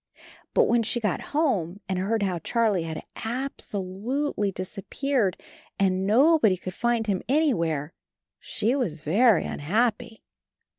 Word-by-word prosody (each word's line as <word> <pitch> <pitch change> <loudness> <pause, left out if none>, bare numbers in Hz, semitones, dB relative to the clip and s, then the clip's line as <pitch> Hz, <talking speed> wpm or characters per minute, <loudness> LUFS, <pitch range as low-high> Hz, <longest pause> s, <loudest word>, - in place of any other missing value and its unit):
But - - +6
when 240 0 +3
she 235 +2 -1
got 210 -6 -1
home 205 - 0
and 190 -1 -1
heard 210 +3 0
how 185 -3 -1
Charlie 215 0 +1
had 160 -1 -5
ab 255 +5 -4
so 205 - -4
lute 225 +11 -3
ly 205 -1 0
disappeared 195 +4 -2 0.4
and 190 -1 +1
nobody 245 - +4
could 185 0 -7
find 235 +2 0
him 195 -4 0
anywhere, 170 - +1 0.5
she 230 +5 -1
was 180 - -2
very 215 +9 +4
unhappy. 220 +7 -1
210 Hz, 140 wpm, -26 LUFS, 185-245 Hz, 0.5 s, But